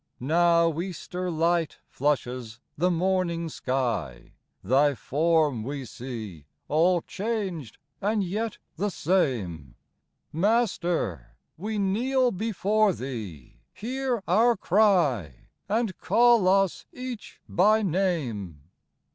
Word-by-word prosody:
Now 170 +3 +3
Easter 180 0 -5
light 165 0 0
flushes 125 -5 -2 0.2
the 180 +4 +2
morning 175 -1 0
sky; 125 - -3 0.3
Thy 140 +6 +3
form 150 -3 +1
we 135 +3 -5
see, 110 - -8 0.2
all 170 +3 +3
changed 195 - -4 0.2
and 210 +1 +1
yet 215 +5 -3 0.2
the 205 +5 0
same. 115 - -1 0.6
Master! 170 - 0 0.2
we 210 +5 -4
kneel 245 +6 +1
before 215 0 +1
Thee 105 - -7
\ - - -51
hear 250 0 -2
our 225 +6 +4
cry, 170 - +2 0.2
And 215 -3 0
call 235 -4 +4
us 195 -1 +2
each 250 -3 -8
by 215 +5 +3
name. 140 - -2
170 Hz, 100 wpm, -26 LUFS, 130-205 Hz, 0.6 s, our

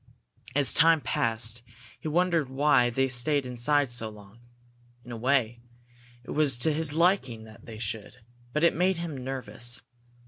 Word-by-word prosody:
As 140 -7 +3
time 165 +1 +5
passed, 115 -1 -2 0.4
he - - -6
wondered 165 -3 +1
why 135 -2 +3
they 135 +3 +1
stayed 135 +3 0
inside 125 +2 +1
so 115 -2 -2
long. 105 +1 -15 0.7
In 125 - -10
a - - -5
way, 120 -1 +1 0.6
it - - -9
was 145 -4 +2
to 155 +6 +1
his 155 -1 0
liking 160 - +1
that 110 +4 -15
they 110 -2 -8
should, 110 +1 -5 0.3
but 150 +4 -1
it 170 - +5
made 185 +1 +1
him 170 -3 -5
nervous. 125 -2 -3
130 Hz, 160 wpm, -27 LUFS, 115-150 Hz, 0.7 s, time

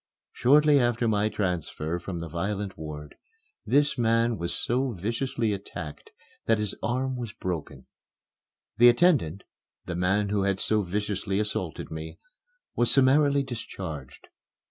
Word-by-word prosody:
Shortly 145 +3 +5
after 120 -1 +1
my 105 -1 +2
transfer 90 -4 -2
from 90 +1 -5
the 85 0 -5
violent 95 +4 -3
ward 75 -1 -8 0.5
this 145 -1 +2
man 115 0 +2
was 85 -3 -3
so 125 +1 0
viciously 115 +3 -1
attacked 90 -6 -7 0.4
that 115 - +4
his 105 -2 -2
arm 130 +2 -1
was 120 -4 -5
broken. 90 -5 -5 0.9
The 120 +1 +9
attendant 120 - +3 0.4
(the 90 - -4
man 95 +3 +1
who 100 -1 +1
had 95 -1 0
so 110 -1 +1
viciously 100 +1 -2
assaulted 100 -6 -3
me) 80 0 -7 0.6
was 120 - +3
summarily 140 +1 +4
discharged. 95 - -7
105 Hz, 130 wpm, -27 LUFS, 90-120 Hz, 0.9 s, The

